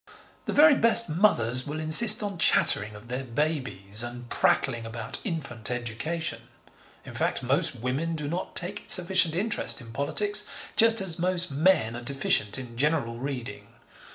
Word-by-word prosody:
The - - -4
very 300 +1 +5
best 230 -5 +5
mothers 130 - +1
will 150 +2 -6
insist 210 +8 +7
on 200 -4 -6
chattering 105 -9 +2
of 105 +3 -14
their 125 +2 -5
babies 125 -7 -3
and 120 0 -7
prattling 120 -4 -1
about 115 +1 -8
infant 140 - -6
education. 120 +2 -5 0.6
In - - -11
fact, - - -3
most - - -1
women 140 +8 -4
do 150 -2 -6
not 170 +5 -6
take 190 +4 -3
sufficient 180 -3 +4
interest 215 +6 0
in 115 -3 -13
politics, 405 - -1 0.3
just 225 -1 +3
as 175 -4 0
most 180 -1 +2
men 140 -7 0
are 120 - -8
deficient 120 -5 -1
in 120 -3 -11
general 140 -4 -2
reading. 130 -2 -8
145 Hz, 155 wpm, -25 LUFS, 120-180 Hz, 0.6 s, insist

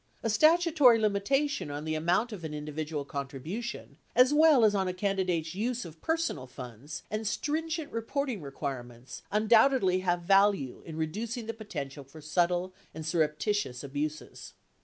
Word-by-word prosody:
A 225 - +1
statutory 310 -2 +5
limitation 225 - 0
on 145 +1 -5
the 155 - -1
amount 175 +9 +1
of 195 -6 -7
an 155 -1 -5
individual 150 0 -4
contribution, 140 - -6 0.2
as 255 +3 +6
well 300 -6 +6
as 210 - +4
on 190 -2 +1
a 180 - -1
candidate's 185 -5 -1
use 235 +4 -2
of 160 -1 -12
personal 320 - -1
funds, 125 +2 -9
and 215 0 -2
stringent 315 +5 -2
reporting 230 - -2
requirements, 130 -4 -6
undoubtedly 220 -2 +4
have 175 -1 0
value 195 -8 +3
in 160 -1 -7
reducing 220 +9 -3
the 225 - -4
potential 150 -10 -6
for 135 +4 -14
subtle 175 +4 0 0.2
and 160 -1 -6
surreptitious 155 - 0
abuses. 150 +2 -5
185 Hz, 145 wpm, -29 LUFS, 150-230 Hz, 0.2 s, as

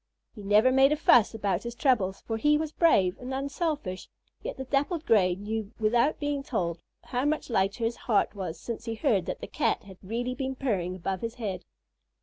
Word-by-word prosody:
He - - -10
never 210 +5 +4
made 270 +2 +5
a - - +4
fuss 240 -7 +5
about 200 -5 0
his 235 0 -6
troubles, 225 -9 +1
for 225 - -3
he 295 +6 +3
was 310 0 -3
brave 200 - +3
and 250 +1 -6
unselfish, 280 - -3 0.3
yet - - -5
the 265 - -4
Dappled 290 +5 -1
Gray 185 -5 +4
knew 210 +2 -4
without 235 +7 +2
being 290 -1 -1
told 175 -11 -2 0.2
how 250 0 -2
much 295 -3 -1
lighter 200 +2 +1
his 230 +1 -1
heart 215 -4 +1
was 185 -5 -5
since 235 -1 -6
he 230 -1 -3
heard 200 -4 +1
that - - -4
the - - -5
Cat - - 0
had 190 -2 -13
really 235 +5 -3
been 265 0 -3
purring 195 -9 -1
above 185 +1 -3
his 230 0 -4
head. 205 -6 -4
230 Hz, 200 wpm, -28 LUFS, 195-270 Hz, 0.3 s, made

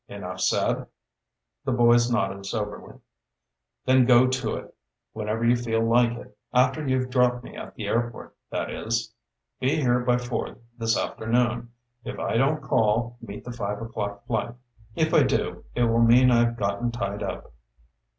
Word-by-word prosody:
Enough - - -7
said?" - - +1 0.8
The 135 - -1
boys 120 0 +4
nodded 100 -4 -1
soberly. 105 -1 -5 0.9
"Then 130 -1 +5
go 125 0 +7
to 130 0 -1
it, - - -9 0.4
whenever 110 +1 -2
you 120 +1 +5
feel 115 -2 0
like 120 0 +3
it 105 - -12 0.2
after 130 +4 +2
you've 130 -1 0
dropped 125 -1 +2
me - - -11
at - - -9
the 110 - -5
airport, 120 +3 -2
that - - -3
is. 115 0 -2 0.5
Be 130 +3 +1
here 125 -3 +2
by 125 0 +2
four 120 -1 -4 0.2
this 115 -1 0
afternoon. 120 +1 0 0.3
If - - -6
I - - -2
don't 145 +4 +1
call, 115 -1 +1
meet 105 -3 -8
the 125 - -6
five 105 -3 -3
o'clock 100 -3 -5
flight. 115 0 -2 0.4
If 160 0 +1
I - - +6
do, - - -1
it 120 - +2
will 115 0 +3
mean 125 +2 +6
I've 120 0 +3
gotten 100 +4 -1
tied 105 -4 -3
up." 100 - -5
120 Hz, 160 wpm, -25 LUFS, 110-125 Hz, 0.9 s, go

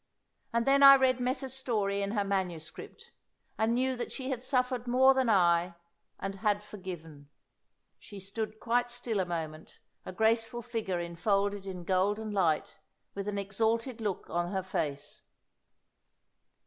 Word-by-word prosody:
And 235 0 +1
then 275 +1 +4
I 275 0 +11
read 260 -2 +3
Meta's 260 +1 -2
story 210 -7 -1
in 200 - -1
her 205 -3 +1
manuscript, 185 -5 -4 0.4
and 225 +2 +1
knew 260 +1 +1
that 245 - -5
she 265 0 -4
had 250 -2 -3
suffered 250 -2 0
more 260 +2 +6
than 260 -2 +1
I, 175 -3 +3 0.4
and 195 0 -4
had 210 0 0
forgiven." 165 -8 -9 0.7
She 205 -3 -11
stood 215 +3 -5
quite 245 +2 +1
still 240 -3 -2
a 185 - 0
moment, 160 -2 -5 0.3
a - - -7
graceful 225 +3 +1
figure 220 -7 -3
enfolded 195 +3 -1
in 180 -2 -6
golden 205 +4 0
light, 190 0 0 0.3
with 200 0 -5
an 205 -1 -2
exalted 225 +4 -1
look 205 -4 -3
on 175 +1 -2
her 190 -2 -1
face. 145 -6 -3
205 Hz, 150 wpm, -30 LUFS, 185-240 Hz, 0.7 s, I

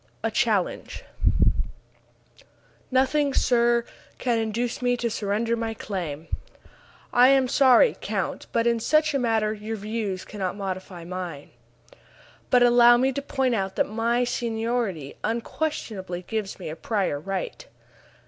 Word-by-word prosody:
A - - 0
CHALLENGE - - 0 1.9
"Nothing, 275 +2 +2
sir, 235 -1 +3 0.3
can 240 -2 0
induce 225 +3 -2
me 245 0 +2
to 235 -1 -1
surrender 215 +2 0
my 225 -1 -3
claim." 170 -8 -5 0.9
"I 245 +1 +7
am 270 -1 +4
sorry, 270 - +5
count, - - -3
but 230 0 +1
in 235 -1 +2
such 310 +6 +2
a 275 - +1
matter 220 -3 +1
your 215 +1 -5
views 210 -3 -3
cannot 195 -3 -4
modify 185 -3 -5
mine." 175 -4 -6 1.0
"But 250 -1 +5
allow 240 0 +7
me 260 +2 +2
to 280 - -2
point 265 -2 0
out 195 -3 -1
that - - +1
my 230 +3 +1
seniority 225 - -2
unquestionably 220 - -3
gives 215 -1 -4
me 180 - -7
a 155 - -5
prior 190 -5 -1
right." 195 - -4
225 Hz, 130 wpm, -25 LUFS, 195-245 Hz, 1.9 s, I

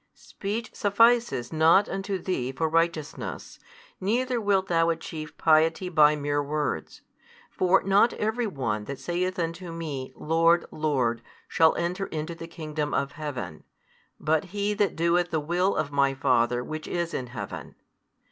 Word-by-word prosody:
Speech 215 +4 -5
sufficeth 210 - +2
not 160 +5 +5
unto 195 0 -3
thee 170 -9 -2
for 160 +5 -1
righteousness, 165 -1 -2 0.4
neither 240 +5 0
wilt 200 -2 +2
thou 165 -2 +2
achieve 160 -2 -5
piety 160 +3 +3
by 150 -3 +5
mere 145 0 -1
words. 150 +1 -3 0.5
For 185 +1 +3
not 200 +5 +4
every 220 +2 -1
one 115 - -3
that 140 +3 -5
saith 180 +2 -2
unto 170 +1 -3
Me, 150 -6 -5
Lord, 165 +2 +3
Lord, 130 -7 0 0.3
shall 160 -2 +4
enter 180 +3 -2
into 155 +1 -4
the 165 0 -9
kingdom 155 -3 -4
of 140 -1 0
Heaven, 130 - -6 0.6
but 155 +3 +1
he 205 +2 -2
that 205 -4 0
doeth 170 +1 +2
the 160 - 0
will 175 +6 0
of 145 - -1
My 140 -1 +2
Father 125 -2 +2
Which 155 +4 -6
is 170 -1 -2
in 125 - -3
Heaven. 120 0 -7
165 Hz, 145 wpm, -26 LUFS, 150-185 Hz, 0.6 s, not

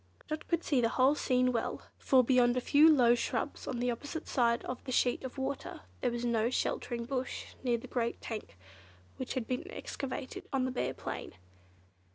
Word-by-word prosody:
Dot 310 0 -4
could 340 -1 0
see 270 -4 +2
the 230 - +3
whole 260 +3 +4
scene 255 -3 +2
well, 235 -2 -2 0.2
for 260 -2 +5
beyond 245 -1 +4
a - - +4
few 295 +5 +6
low 245 -5 +6
shrubs 240 - -2
on 245 - -2
the 245 +1 +1
opposite 290 +7 -5
side 235 -3 +2
of 250 - -5
the 255 - -5
sheet 245 0 +2
of 260 +1 -6
water, 285 +5 -4 0.2
there 250 - +1
was 240 0 -3
no 230 -1 +2
sheltering 240 -1 -1
bush 260 0 -4
near 240 -2 +2
the 230 - -10
great 235 -2 -2
tank 220 - -6 0.6
which 260 - -4
had 255 -3 -1
been 255 - -3
excavated 270 -8 -5
on 265 -2 +1
the 260 - -1
bare 250 - -2
plain. - - -6
255 Hz, 195 wpm, -32 LUFS, 240-270 Hz, 0.6 s, few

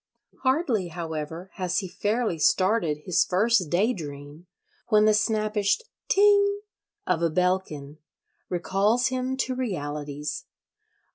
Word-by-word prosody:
Hardly, 260 - +1
however, 165 +1 -6
has 185 -1 -1
he 190 - -1
fairly 205 0 -1
started 170 -3 +2
his 180 -3 +3
first 195 -2 +2
daydream 160 - -2 0.4
when 215 -2 +4
the 215 - +5
snappish 215 - +1 0.3
"ting" 405 0 +4 0.4
of 180 -3 0
a 170 - +2
bellkin 155 -4 -1 0.5
recalls 200 +7 +1
him 260 0 -2
to 260 -1 -1
realities. 150 - -4
190 Hz, 110 wpm, -26 LUFS, 160-230 Hz, 0.5 s, the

